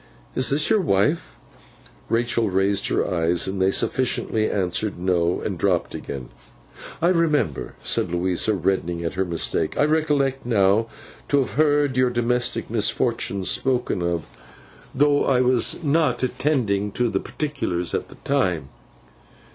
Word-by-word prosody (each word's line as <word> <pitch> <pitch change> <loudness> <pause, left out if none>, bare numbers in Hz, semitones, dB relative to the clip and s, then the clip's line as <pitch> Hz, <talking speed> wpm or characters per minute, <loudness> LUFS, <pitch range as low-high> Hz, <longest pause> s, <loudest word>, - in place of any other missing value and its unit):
Is 130 - +1
this 150 +2 +2
your 215 -2 +4
wife?' 145 - 0 0.7
Rachael 115 -1 +1
raised 95 +1 +1
her - - 0
eyes, 85 -1 0
and 95 0 -3
they 95 - +4
sufficiently 110 0 0
answered 100 +1 -1
no, 90 -1 0
and - - -4
dropped - - 0
again. 65 -3 -7 0.7
'I 170 - +5
remember,' 155 - 0
said - - 0
Louisa, 90 +4 0
reddening 90 -2 -1
at 85 - -3
her 95 - 0
mistake; 85 -2 -1
'I 145 - +4
recollect, 145 -4 +1
now, 105 -1 +2 0.4
to 145 - +2
have 135 - 0
heard 145 -2 +2
your 130 -1 +3
domestic 120 0 0
misfortunes 105 -3 0
spoken 125 -7 0
of, 85 -2 -1 0.7
though 145 +1 +3
I 130 -2 +2
was 125 +5 +2
not 145 -4 +1
attending 125 -6 0
to 125 - +1
the - - -1
particulars 140 - -3
at - - -2
the - - -13
time. 90 - 0
115 Hz, 140 wpm, -23 LUFS, 95-140 Hz, 0.7 s, I